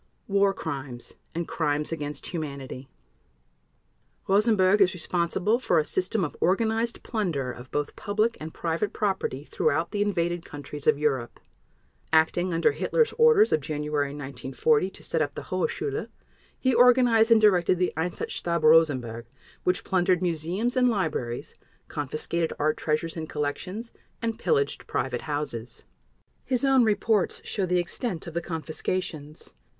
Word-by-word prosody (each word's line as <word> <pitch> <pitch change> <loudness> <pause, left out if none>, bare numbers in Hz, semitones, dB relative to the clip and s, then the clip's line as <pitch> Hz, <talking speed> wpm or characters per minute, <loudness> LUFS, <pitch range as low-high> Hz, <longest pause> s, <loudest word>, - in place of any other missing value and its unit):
War 200 0 +3
Crimes 135 -9 -6 0.2
and 170 0 -2
Crimes 150 -1 -1
against 145 -3 -4
Humanity 140 -5 -6 1.4
Rosenberg 205 -1 +4
is 185 0 +4
responsible 180 +6 0
for 180 -9 +1
a 155 - +3
system 185 +4 0
of 150 - -7
organized 225 +5 +1
plunder 170 - -2
of 125 +1 -11
both 145 0 -2
public 215 +3 0
and 155 +1 -6
private 170 +7 -2
property 190 -9 -1
throughout 160 +3 0
the 205 - -1
invaded 175 -4 0
countries 145 0 -8
of - - +5
Europe. 135 -5 -1 0.7
Acting 160 +3 +3
under 165 0 +3
Hitler's 470 -2 +1
orders 460 -2 +6
of 155 - +2
January 150 0 -1
1940 140 +4 0
to - - -10
set 165 - -1
up 145 -2 -1
the - - -6
"Hohe 185 0 -1
Schule", 425 +1 -3 0.5
he 260 -1 +2
organized 245 -2 +5
and 230 -1 +7
directed 185 -4 +4
the 180 0 0
"Einsatzstab 170 0 -2
Rosenberg", 130 -8 +3 0.4
which 180 +1 +1
plundered 185 -1 +2
museums 180 - -1
and 250 -1 +4
libraries, 155 - -2 0.3
confiscated 155 +3 -2
art 155 +1 +1
treasures 160 +2 -1
and 160 -2 -5
collections, 185 +10 -4 0.3
and 230 -1 -3
pillaged 435 -2 0
private - - -2
houses. 145 -6 -4 0.6
His 255 +1 0
own 265 -2 +5
reports 215 -2 +1
show 195 -3 -2
the 180 0 +2
extent 175 +2 -3
of 170 - -8
the 170 - -1
confiscations. 155 - -4
170 Hz, 140 wpm, -26 LUFS, 150-205 Hz, 1.4 s, and